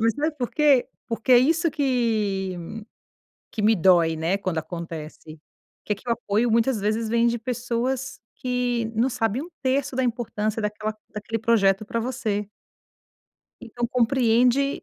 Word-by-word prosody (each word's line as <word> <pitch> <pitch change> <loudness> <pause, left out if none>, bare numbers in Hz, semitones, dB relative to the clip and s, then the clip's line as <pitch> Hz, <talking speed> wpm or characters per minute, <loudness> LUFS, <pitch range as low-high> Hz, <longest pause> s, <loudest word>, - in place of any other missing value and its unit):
mas 225 0 +2
sabe 300 +1 -2
por 245 -2 -2
quê? 290 -5 +4 0.2
Porque 230 +2 0
é 245 - +9
isso 330 +6 +3
que 220 -9 0 1.0
que 215 - -3
me 220 +1 +4
dói, 170 -2 +4
né, 165 +5 0
quando 185 -4 -2
acontece. 160 -1 -7 0.5
Que 210 - 0
que 215 +5 -14
o 235 - +3
apoio 230 0 0
muitas 230 0 +2
vezes 220 +2 -1
vem 235 +1 +3
de 235 - -1
pessoas 250 +3 -2 0.2
que 245 -2 -1
não 235 +4 +3
sabem 230 -1 -1
1/3 275 -5 -2
da 260 - +1
importância 225 -2 -2
daquela 210 +1 -2 0.2
daquele 215 +2 -3
projeto 215 -3 +3
pra 230 - -2
você. 220 -4 -2 1.1
Então 240 +1 -3
compreende 250 +2 +2
230 Hz, 145 wpm, -24 LUFS, 210-255 Hz, 1.1 s, é